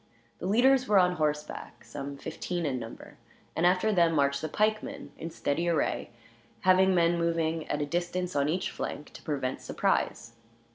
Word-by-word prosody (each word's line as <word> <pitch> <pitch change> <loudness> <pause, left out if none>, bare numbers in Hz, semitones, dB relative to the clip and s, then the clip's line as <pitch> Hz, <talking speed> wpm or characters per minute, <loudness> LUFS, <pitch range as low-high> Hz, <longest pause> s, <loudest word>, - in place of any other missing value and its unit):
The - - -3
leaders 255 +5 +4
were 210 - +4
on 180 -1 +4
horseback, 150 -1 -3
some 140 0 -7
fifteen 175 +4 -4
in 130 -3 -1
number; 115 -1 -10 0.4
and 170 +2 +3
after 185 +4 +3
them 170 -3 +4
marched 140 -2 +2
the 155 - -3
pikemen, 215 +5 -1
in 165 - -6
steady 165 +1 -1
array, 165 -4 0 0.5
having 185 0 +5
men 170 0 +3
moving 165 -1 0
at 150 0 0
a - - -1
distance 175 +2 -2
on 140 +1 +2
each 180 +4 -1
flank, 150 - -6
to - - -11
prevent 135 -4 -2
surprise. 115 0 -1
170 Hz, 165 wpm, -29 LUFS, 145-180 Hz, 0.5 s, having